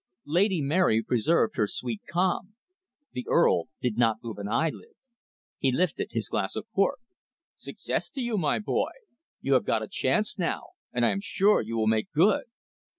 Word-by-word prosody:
Lady 180 Hz, +1 st, +2 dB
Mary 140 Hz, -7 st, +3 dB
preserved 125 Hz, +4 st, +1 dB
her 105 Hz, -, +2 dB
sweet 115 Hz, 0 st, -4 dB
calm. 185 Hz, +3 st, 0 dB, 0.6 s
The 125 Hz, -, -5 dB
Earl -, -, +4 dB, 0.2 s
did 120 Hz, -3 st, -1 dB
not 115 Hz, -1 st, +2 dB
move 110 Hz, -4 st, -6 dB
an 100 Hz, -, -4 dB
eyelid. 160 Hz, -, -2 dB, 0.6 s
He 135 Hz, -, +2 dB
lifted 170 Hz, +6 st, 0 dB
his 110 Hz, -3 st, -2 dB
glass 100 Hz, -4 st, -2 dB
of -, -, -4 dB
port. 220 Hz, +7 st, +2 dB, 0.6 s
"Success -, -, -4 dB
to 275 Hz, -, -5 dB
you, 240 Hz, -2 st, -1 dB
my 155 Hz, -8 st, +1 dB
boy. 210 Hz, -, 0 dB, 0.5 s
You -, -, +1 dB
have -, -, +4 dB
got -, -, 0 dB
a -, -, -5 dB
chance 210 Hz, -1 st, 0 dB
now. 170 Hz, -, -2 dB, 0.2 s
And 120 Hz, -1 st, +1 dB
I -, -, +3 dB
am 195 Hz, -, -2 dB
sure 205 Hz, +1 st, +3 dB
you 115 Hz, +1 st, -4 dB
will 110 Hz, -, +1 dB
make 110 Hz, 0 st, +1 dB
good." 210 Hz, -, +3 dB
150 Hz, 175 wpm, -27 LUFS, -, 0.6 s, Earl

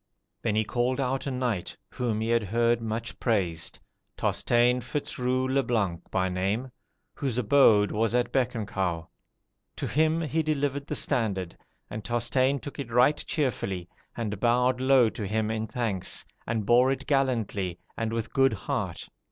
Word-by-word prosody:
Then 110 Hz, -2 st, 0 dB
he 110 Hz, -, +3 dB
called 125 Hz, +4 st, 0 dB
out 135 Hz, +1 st, -1 dB
a -, -, +1 dB
knight, 125 Hz, -8 st, -2 dB
whom 120 Hz, -4 st, -1 dB
he 110 Hz, -, -1 dB
had 115 Hz, 0 st, +3 dB
heard 115 Hz, +3 st, +1 dB
much 115 Hz, +1 st, -4 dB
praised, 90 Hz, -8 st, -1 dB, 0.4 s
Tosteins 120 Hz, +1 st, +2 dB
Fitz 135 Hz, +4 st, -4 dB
Rou 130 Hz, +1 st, +1 dB
le 135 Hz, +1 st, +2 dB
Blanc 100 Hz, -10 st, 0 dB
by 95 Hz, -1 st, +1 dB
name, 100 Hz, +8 st, -1 dB, 0.4 s
whose 130 Hz, -5 st, -2 dB
abode 110 Hz, -4 st, +5 dB
was 115 Hz, +2 st, +1 dB
at 125 Hz, -1 st, +1 dB
Bec 125 Hz, -2 st, +1 dB
en 110 Hz, -2 st, -2 dB
Caux. 90 Hz, -5 st, -2 dB, 0.7 s
To -, -, -4 dB
him 160 Hz, +2 st, +2 dB
he 160 Hz, +1 st, 0 dB
delivered 145 Hz, -2 st, -1 dB
the -, -, -2 dB
standard; 100 Hz, -, 0 dB, 0.3 s
and 110 Hz, 0 st, -6 dB
Tosteins 130 Hz, +3 st, +1 dB
took 145 Hz, -, -8 dB
it 135 Hz, -, -4 dB
right 125 Hz, +5 st, +3 dB
cheerfully, 100 Hz, -, -1 dB, 0.3 s
and 105 Hz, -4 st, -3 dB
bowed 125 Hz, +2 st, +2 dB
low 130 Hz, -2 st, +5 dB
to 105 Hz, -2 st, -5 dB
him 110 Hz, +1 st, 0 dB
in 110 Hz, 0 st, -2 dB
thanks, 115 Hz, -5 st, -2 dB, 0.2 s
and 110 Hz, -2 st, -1 dB
bore 125 Hz, +4 st, +5 dB
it 135 Hz, 0 st, -3 dB
gallantly, 115 Hz, -, 0 dB, 0.2 s
and 115 Hz, -1 st, -2 dB
with 115 Hz, -1 st, -3 dB
good 135 Hz, -3 st, +4 dB
heart. 110 Hz, -6 st, -3 dB
120 Hz, 165 wpm, -27 LUFS, 105-130 Hz, 0.7 s, abode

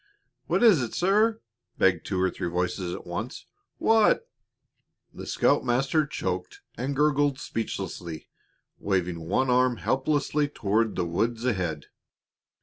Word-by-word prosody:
"What -, -, +1 dB
is 205 Hz, -, +6 dB
it, 120 Hz, -, -4 dB
sir?" 215 Hz, +5 st, +2 dB, 0.4 s
begged 90 Hz, -3 st, +2 dB
two 95 Hz, -, -1 dB
or 95 Hz, 0 st, +2 dB
three -, -, -4 dB
voices 90 Hz, +1 st, -2 dB
at -, -, -10 dB
once. 105 Hz, -, -5 dB, 0.3 s
"What 225 Hz, -, +3 dB, 0.5 s
" -, -, -48 dB
The -, -, -9 dB
scoutmaster 135 Hz, +3 st, +2 dB
choked 90 Hz, -9 st, -4 dB
and 135 Hz, +3 st, -3 dB
gurgled 145 Hz, -1 st, +2 dB
speechlessly, 90 Hz, -, -5 dB, 0.5 s
waving 90 Hz, -3 st, -1 dB
one 130 Hz, +6 st, +2 dB
arm 125 Hz, -1 st, +3 dB
helplessly 145 Hz, +3 st, 0 dB
toward 110 Hz, -4 st, 0 dB
the 90 Hz, -, 0 dB
woods 115 Hz, +8 st, -1 dB
ahead. 90 Hz, -, -1 dB
120 Hz, 130 wpm, -26 LUFS, 90-145 Hz, 0.5 s, is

